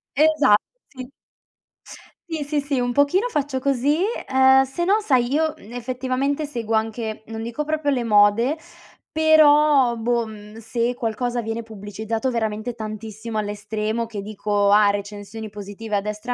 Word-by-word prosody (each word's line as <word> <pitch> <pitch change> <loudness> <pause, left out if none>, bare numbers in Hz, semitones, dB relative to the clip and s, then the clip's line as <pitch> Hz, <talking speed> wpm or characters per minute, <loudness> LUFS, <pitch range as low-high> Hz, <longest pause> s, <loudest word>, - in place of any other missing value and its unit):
Esatto, 295 -7 +4 0.2
sì. 255 -2 -10 1.2
Sì, 315 -2 -2
sì, 290 0 -1
sì, 280 -2 -1
un 245 0 0
pochino 285 - +3
faccio 290 - -2
così, 275 +2 +1 0.3
uhm, 265 0 +6
sennò 345 +10 +1
sai, 255 - +1
io 315 +1 +1
effettivamente 255 +5 -3
seguo 230 -6 -3
anche 220 0 -2
non 225 0 -7
dico 235 +6 -4
proprio 310 -1 -1
le 260 -4 +1
mode, 215 +5 +4 0.6
però 300 -5 +5
boh, 235 0 0 0.3
se 235 +2 -1
qualcosa 240 +1 -2
viene 225 +1 -4
pubblicizzato 220 +2 -4
veramente 220 0 -2
tantissimo 220 0 -5
all'estremo 215 +2 -3
che 220 -3 -6
dico: 205 0 0
"Ah, 205 0 +5
recensioni 205 +2 -6
positive 205 +1 -6
a 200 - +1
destra 210 +4 -4
235 Hz, 135 wpm, -22 LUFS, 215-275 Hz, 1.2 s, uhm